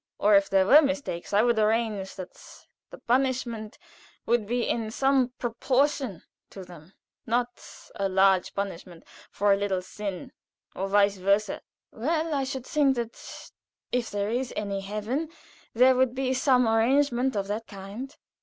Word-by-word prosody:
Or, 210 +1 +3
if 200 0 +4
there 190 -1 +3
were 290 +10 +8
mistakes, 280 - -3
I 205 +2 +4
would 235 -2 +2
arrange 215 -3 0
that 185 -2 -8 0.6
the - - -11
punishment 240 -4 -1 0.5
should 235 -3 +1
be 240 +1 -1
in 225 -2 -1
some 265 +2 +2
proportion 255 - 0 0.3
to 195 - -10
them 175 0 -14 0.3
not 240 +1 -1 0.3
a 195 -1 -2
large 190 -1 +3
punishment 185 -3 -5 0.3
for 205 0 +2
a - - +2
little 195 -2 -1
sin, 195 -1 -6 0.4
and 195 +1 -4
vice 200 -1 +3
versâ." 200 +2 +1 0.3
"Well, 315 +6 -1
I 275 -2 0
should 265 -1 -5
think 280 -3 +2
that 235 -1 -7 0.4
if 245 -2 -1
there 205 +1 -2
is 250 +1 -2
any 200 -2 -3
heaven 215 +10 -3 0.5
there 255 +3 +6
would 255 -1 +1
be 260 0 0
some 255 -2 +3
arrangement 250 +3 +2
of 200 -1 -1
that 220 +2 -3
kind." 205 +7 -9
225 Hz, 155 wpm, -26 LUFS, 200-260 Hz, 0.6 s, were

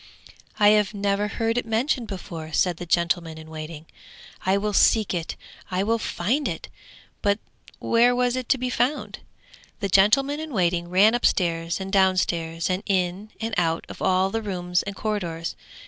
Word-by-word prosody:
'I 205 -1 +7
have 210 -1 +3
never 200 +1 0
heard 225 +3 0
it - - -5
mentioned 235 +2 0
before,' 165 -5 -7
said 180 -3 +2
the 175 - -7
gentleman 170 -1 0
in 160 0 -11
waiting. 155 0 -7 0.6
'I 190 +1 +4
will 210 +1 -1
seek 215 +1 +4
it, 170 -2 -3 0.3
and 185 -1 -2
I - - +2
will 225 +2 +1
find 240 +10 -1
it!' - - -5 0.5
But 200 0 +2 0.4
where 240 +1 +3
was 245 0 +1
it 255 -2 -4
to 270 - +4
be 250 0 -2
found? 260 +4 -1 0.6
The 200 -3 -2
gentleman 270 - +4
in 315 -2 -6
waiting 175 -3 0
ran 200 +5 +5
upstairs 170 -8 +1
and 190 0 -5
downstairs 175 -4 +1
and 185 +1 -1
in 185 +2 0
and 225 0 -3
out 165 -2 0
of - - -10
all 185 +1 +2
the 225 - -1
rooms 180 -3 -1
and 200 0 -6
corridors. 175 -7 -3
195 Hz, 175 wpm, -24 LUFS, 175-225 Hz, 0.6 s, I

